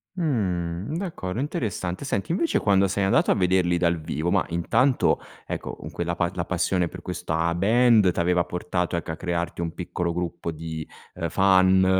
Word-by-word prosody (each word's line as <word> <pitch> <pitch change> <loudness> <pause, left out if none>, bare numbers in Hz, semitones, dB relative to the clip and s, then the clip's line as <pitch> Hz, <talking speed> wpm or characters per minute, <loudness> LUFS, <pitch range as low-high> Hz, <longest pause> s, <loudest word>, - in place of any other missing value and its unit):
Mh. 100 - -1
D'accordo, 125 - -4
interessante. 110 - -3
Senti 100 0 -2
invece 170 -1 +1
quando 100 -1 +3
sei 100 +1 -1
andato 95 - +3
a - - +5
vederli 90 -2 +2
dal 85 -1 +1
vivo, 80 +2 -2
mah, 100 -1 +2
intanto, 115 +10 +2 0.3
ecco, - - -5
con - - -9
quella 85 0 -2
pa 85 +1 0
la 85 -2 -3
passione 90 0 0
per 90 - -10
questa 85 -2 -1
band 110 0 +4
t'aveva 90 +1 +2
portato 90 0 -2
ecco 85 -1 -3
a - - -4
crearti 85 0 -3
un 85 -1 -3
piccolo 85 -1 -3
gruppo 85 -1 -3
di, 80 0 -6 0.3
ehm, 85 - -3
fan, 95 0 +4
90 Hz, 170 wpm, -25 LUFS, 85-100 Hz, 0.3 s, a